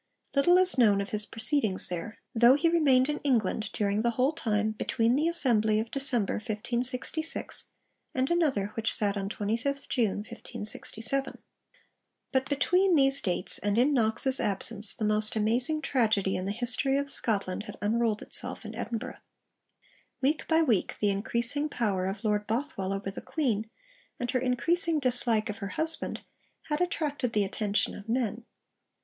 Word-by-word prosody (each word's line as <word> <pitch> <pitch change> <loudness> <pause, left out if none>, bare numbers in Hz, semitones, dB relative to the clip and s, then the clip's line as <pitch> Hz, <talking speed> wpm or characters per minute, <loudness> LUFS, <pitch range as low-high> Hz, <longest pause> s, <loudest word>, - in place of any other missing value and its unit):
Little 350 +6 +5
is 370 -7 +3
known 210 -4 +5
of 200 - -3
his 210 0 -1
proceedings 225 -4 +2
there; 180 +5 -5 0.2
though 240 +3 +6
he 320 +4 +2
remained 275 -6 +4
in 300 0 -2
England 225 -5 0
during 205 0 0
the 235 - +1
whole 255 +6 +1
time 215 -8 0
between 225 +2 0
the 305 +4 +1
Assembly 225 -10 +3
of 225 +1 -4
December 260 -7 0
1566 245 +8 -2 0.5
and 260 +4 0
another 285 - +1
which 225 -1 -1
sat 205 -1 0
on 195 -1 -3
25th 230 +8 -2
June 215 -4 0
1567. 225 +5 -4 0.9
But 265 0 0
between 360 +6 +3
these 275 -1 +3
dates, 180 -1 +1
and 205 +1 -1
in 265 +5 +3
Knox's 245 +2 +3
absence, 210 +1 0
the 215 - -2
most 215 +1 +1
amazing 245 +9 +1
tragedy 215 -7 +1
in 185 - -3
the 195 - -2
history 250 +4 0
of 280 0 -1
Scotland 205 -6 -2
had - - -9
unrolled 220 0 0
itself 245 -1 -3
in 215 - -7
Edinburgh. 230 +1 -5 1.0
Week 285 +4 0
by 325 0 +3
week, 230 - 0
the 205 -1 +1
increasing 235 +8 0
power 195 -8 -1
of 195 +3 -5
Lord 210 -1 0
Bothwell 220 -5 -2
over 195 0 -3
the - - -8
Queen, 225 -8 -2 0.5
and 245 -1 -2
her 255 - +1
increasing 320 +7 +1
dislike 245 -4 +1
of 205 - -11
her 200 - -4
husband, 320 +1 -1 0.5
had 300 +3 -1
attracted 295 -8 -1
the 210 - +2
attention 205 +1 -1
of 205 +2 -11
men. 235 -1 -1
235 Hz, 160 wpm, -28 LUFS, 210-275 Hz, 1.0 s, though